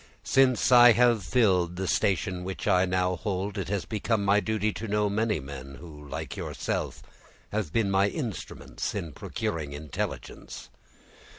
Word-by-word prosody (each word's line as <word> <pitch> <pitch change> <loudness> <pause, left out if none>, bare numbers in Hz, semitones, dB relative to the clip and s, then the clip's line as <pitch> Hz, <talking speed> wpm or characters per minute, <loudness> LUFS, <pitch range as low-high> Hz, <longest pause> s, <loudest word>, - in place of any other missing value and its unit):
Since 130 -2 +3
I 120 -1 +9
have 120 -1 +4
filled 90 -4 +2
the 95 +1 -3
station 95 0 0
which 95 +1 -5
I 90 +1 +4
now 90 0 0
hold, 100 +1 -3
it 95 - -4
has 100 -2 -1
become 110 -1 -1
my 100 +1 +4
duty 110 -1 -1
to 115 - -6
know 105 0 +1
many 110 -2 0
men, 70 0 -8
who, 75 -2 -12
like - - -5
yourself, - - -4 0.5
have 105 -7 -2
been 105 0 +1
my 100 +1 +3
instruments 120 - -5
in 80 - -4
procuring 75 -4 -4
intelligence. 75 +1 -6
100 Hz, 155 wpm, -27 LUFS, 90-110 Hz, 0.5 s, I